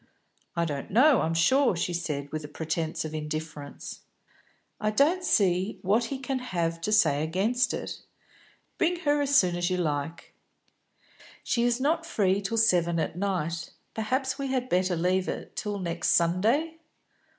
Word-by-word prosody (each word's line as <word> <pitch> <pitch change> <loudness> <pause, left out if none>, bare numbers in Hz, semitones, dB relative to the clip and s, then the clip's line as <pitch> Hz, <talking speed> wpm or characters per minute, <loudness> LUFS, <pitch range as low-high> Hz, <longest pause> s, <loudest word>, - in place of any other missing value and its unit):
"I 170 0 +1
don't 145 -4 -4
know, 260 +5 +5
I'm 165 +1 0
sure," 255 +8 +4
she 175 +1 -2
said, 150 -5 -3
with 155 0 -4
a - - -6
pretence 160 +2 -3
of 155 - -6
indifference. 155 -1 -6 0.8
"I 215 - 0
don't 300 - +2
see 190 - +2
what 215 +5 +2
he 270 +3 -4
can 265 0 -3
have 170 -8 -2
to 210 - -2
say 150 -9 +4
against 200 +10 +1
it. - - -5 0.8
Bring 345 +1 +1
her 290 -2 +2
as 285 0 +1
soon 180 -9 +4
as 175 +1 0
you 185 - 0
like." 155 -1 -3 1.1
"She 235 - 0
is 240 0 +1
not 320 +5 +1
free 200 - +1
till 225 +3 -2
seven 175 -6 +3
at 160 - -2
night. 170 -4 -2 0.2
Perhaps 260 +5 -1
we 275 - -2
had 255 -1 -1
better 185 -2 +2
leave 185 +3 +1
it - - -5
till 205 -1 -3
next 170 -3 -3
Sunday?" 225 - +2
185 Hz, 160 wpm, -27 LUFS, 165-250 Hz, 1.1 s, know